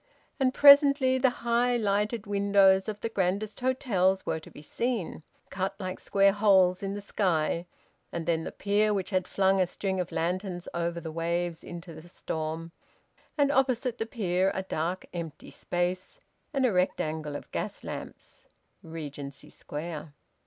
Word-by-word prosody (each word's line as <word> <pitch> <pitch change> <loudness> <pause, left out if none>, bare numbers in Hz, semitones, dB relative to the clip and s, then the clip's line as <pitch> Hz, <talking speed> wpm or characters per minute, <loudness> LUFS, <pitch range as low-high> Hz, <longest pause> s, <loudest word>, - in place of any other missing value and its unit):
And 260 -1 +3
presently 280 -2 +7
the 260 0 +4 0.2
high 240 +1 +2
lighted 210 +1 0
windows 200 -1 +4
of 210 -1 -5
the 230 - -2
grandest 200 +1 -1
hotels 200 -8 +1
were - - -1
to 155 - -14
be 150 - -13
seen, 230 - -2 0.3
cut 195 +1 -2
like 185 -1 -4
square 195 0 +3
holes 190 -3 +4
in 195 0 -3
the 205 - -5
sky; 170 -4 0 0.4
and 170 -1 -4
then 165 -1 0
the - - -5
pier, 205 +1 +1
which 195 0 -3
had 185 -1 0
flung 190 0 +2
a 185 - +2
string 190 +1 -3
of 180 -1 -3
lanterns 180 +1 -2
over 170 0 -2
the 160 -1 -6
waves 170 +1 -2
into 170 -1 -8
the 155 +2 -12
storm; 160 0 -4 0.7
and 285 -1 +3
opposite 255 -3 +1
the 225 - -2
pier 190 -4 0
a 190 - -2
dark 175 0 -3
empty 165 -3 -7
space 180 - -3 0.3
and 275 -3 +1
a 245 - +3
rectangle 160 -5 -1
of - - -8
gas - - -4
lamps: - - -9 0.3
Regency 145 -3 -8
Square. 150 -1 -7
190 Hz, 160 wpm, -28 LUFS, 170-215 Hz, 0.7 s, presently